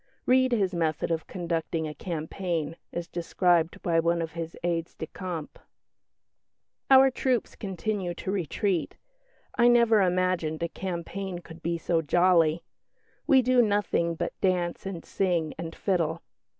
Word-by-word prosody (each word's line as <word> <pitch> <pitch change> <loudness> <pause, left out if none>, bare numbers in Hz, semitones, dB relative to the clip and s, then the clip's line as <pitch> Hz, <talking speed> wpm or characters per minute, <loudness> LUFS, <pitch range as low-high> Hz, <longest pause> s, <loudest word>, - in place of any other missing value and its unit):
Read 260 0 +4
his 200 -5 +1
method 165 -2 -1
of 160 -1 -2
conducting 165 -2 -2
a 150 - -5
campaign, 165 0 -3 0.2
as 170 0 -4
described 175 -1 +1
by 165 -1 +2
one 170 +1 +1
of 165 -1 -3
his 165 -1 -6
aides 170 -1 -2
de - - -5
camp 170 -2 -6 1.3
"Our 265 0 +7
troops 255 -2 -1
continue 190 -2 -3
to 190 - -4
retreat 190 -1 -1 0.6
I 240 - +6
never 235 -3 +5
imagined 180 -3 0
a 170 - -1
campaign 185 +1 -5
could 170 -1 -12
be 170 +1 -1
so 165 0 0
jolly. 170 0 +3 0.6
We 270 -4 +6
do 250 0 +4
nothing 205 -6 +1
but - - -3
dance 180 -1 0
and 175 -4 -6
sing 175 -5 0
and 165 -1 -5
fiddle. 170 -4 -1
175 Hz, 140 wpm, -27 LUFS, 165-195 Hz, 1.3 s, Our